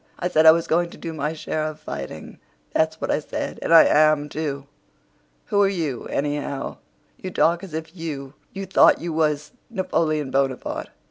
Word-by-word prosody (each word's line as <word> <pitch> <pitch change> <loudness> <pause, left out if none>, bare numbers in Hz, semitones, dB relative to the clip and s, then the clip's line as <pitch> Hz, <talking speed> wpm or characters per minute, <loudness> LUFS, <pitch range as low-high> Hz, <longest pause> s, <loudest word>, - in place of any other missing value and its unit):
I 180 - -2
said 160 -2 +4
I - - +12
was 165 +1 +1
going 170 +1 +1
to - - -13
do 165 -1 -6
my 150 0 -2
share 155 0 -3
of 155 0 -7
fighting—that's 160 - -4
what - - -2
I - - +2
said. 150 - -5
And - - -2
I 165 -1 +10
am, 155 -1 +4
too. 145 -3 -4 0.8
Who 205 - +2
are 200 - +4
you, 160 -10 -3
anyhow? 145 -1 -3 0.4
You 185 - -6
talk 170 -1 +2
as 175 -5 -7
if 160 +2 -6
you 145 -5 -6 0.3
thought 190 - +5
you 170 -1 -4
was 150 -1 0 0.2
Napoleon 165 - -1
Bonaparte." 135 -1 -1
155 Hz, 175 wpm, -23 LUFS, 145-165 Hz, 0.8 s, I